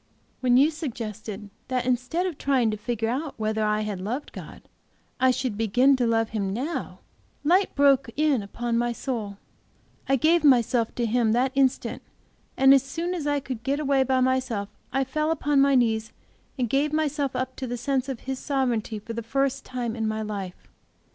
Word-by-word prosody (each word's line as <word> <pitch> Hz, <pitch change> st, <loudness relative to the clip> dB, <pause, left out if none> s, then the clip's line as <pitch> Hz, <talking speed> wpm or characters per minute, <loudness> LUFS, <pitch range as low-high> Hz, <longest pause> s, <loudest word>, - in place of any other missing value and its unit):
When 250 Hz, -1 st, +3 dB
you 290 Hz, +4 st, +5 dB
suggested 215 Hz, -, -6 dB, 0.2 s
that 255 Hz, -1 st, -1 dB
instead 255 Hz, +8 st, 0 dB
of 350 Hz, -6 st, -4 dB
trying 255 Hz, -5 st, +2 dB
to -, -, -2 dB
figure 225 Hz, +1 st, -2 dB
out 270 Hz, +5 st, -3 dB
whether 220 Hz, 0 st, -1 dB
I 210 Hz, 0 st, +1 dB
had 205 Hz, -3 st, -4 dB
loved 245 Hz, +9 st, -4 dB
God, -, -, -10 dB, 0.6 s
I 260 Hz, 0 st, +4 dB
should 255 Hz, -3 st, -1 dB
begin 245 Hz, +6 st, +3 dB
to 245 Hz, -2 st, +1 dB
love 225 Hz, -1 st, +1 dB
Him 200 Hz, -3 st, -2 dB
now, 270 Hz, -, -4 dB, 0.4 s
light 365 Hz, +6 st, +2 dB
broke 275 Hz, -3 st, +4 dB
in 295 Hz, -5 st, +2 dB
upon 230 Hz, +3 st, -2 dB
my 240 Hz, 0 st, 0 dB
soul; 225 Hz, -6 st, -4 dB, 0.7 s
I 270 Hz, -, +5 dB
gave 320 Hz, +5 st, +3 dB
myself 240 Hz, -4 st, +3 dB
to 240 Hz, -, 0 dB
Him 230 Hz, -1 st, +2 dB
that 255 Hz, +3 st, +2 dB
instant 270 Hz, -1 st, +1 dB, 0.6 s
and 270 Hz, +1 st, +7 dB
as 275 Hz, -, +6 dB
soon 330 Hz, +6 st, -3 dB
as 320 Hz, -5 st, -3 dB
I 290 Hz, 0 st, +1 dB
could 260 Hz, -4 st, -6 dB
get 275 Hz, +4 st, -1 dB
away 280 Hz, -2 st, +2 dB
by 260 Hz, 0 st, +2 dB
myself 255 Hz, -6 st, 0 dB, 0.2 s
I 270 Hz, +1 st, +1 dB
fell 305 Hz, +4 st, -1 dB
upon 295 Hz, -3 st, +2 dB
my 275 Hz, 0 st, +4 dB
knees 225 Hz, -3 st, +1 dB, 0.4 s
and 250 Hz, -2 st, 0 dB
gave 280 Hz, +5 st, +1 dB
myself 295 Hz, -3 st, -1 dB
up 255 Hz, +1 st, -3 dB
to 260 Hz, -, -4 dB
the 245 Hz, 0 st, -3 dB
sense 265 Hz, +2 st, -1 dB
of 260 Hz, -4 st, -5 dB
His 265 Hz, 0 st, -4 dB
sovereignty 245 Hz, -6 st, -1 dB
for 220 Hz, +2 st, -7 dB
the 235 Hz, -, -3 dB
first 270 Hz, +3 st, -1 dB
time 245 Hz, -3 st, -3 dB
in 220 Hz, -2 st, -1 dB
my 215 Hz, 0 st, -2 dB
life. 200 Hz, -4 st, -6 dB
255 Hz, 190 wpm, -25 LUFS, 225-275 Hz, 0.7 s, and